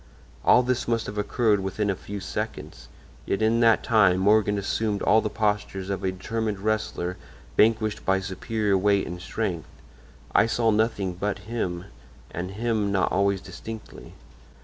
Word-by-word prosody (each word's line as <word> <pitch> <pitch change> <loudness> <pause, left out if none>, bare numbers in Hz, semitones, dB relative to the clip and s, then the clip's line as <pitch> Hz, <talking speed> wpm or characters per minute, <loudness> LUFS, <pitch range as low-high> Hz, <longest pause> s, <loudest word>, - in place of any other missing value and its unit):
"All 125 - +6
this 125 0 -1
must 115 -1 0
have 105 0 -5
occurred 105 0 +2
within 95 +2 -1
a - - -2
few 100 +2 -7
seconds, 100 - -6 0.4
yet 100 - 0
in 115 +1 +3
that 115 -1 +4
time 100 -5 +4
Morgan 105 +1 +3
assumed 100 +1 -1
all 110 +1 +5
the 105 - -2
postures 105 -3 -1
of 100 0 -3
a 95 - +1
determined 110 +2 -3
wrestler 100 -3 -2 0.4
vanquished 110 -1 +2
by 95 0 +2
superior 100 +2 -1
weight 100 0 +2
and 90 0 -7
strength. 90 -5 -3 0.6
I 115 - +5
saw 115 0 +2
nothing 105 -4 0
but 100 +3 -2
him, 95 -6 -3 0.5
and 90 +2 -4
him 105 0 -1
not 95 -2 +1
always 100 -1 +1
distinctly. 110 +1 -10
105 Hz, 155 wpm, -25 LUFS, 95-110 Hz, 0.6 s, All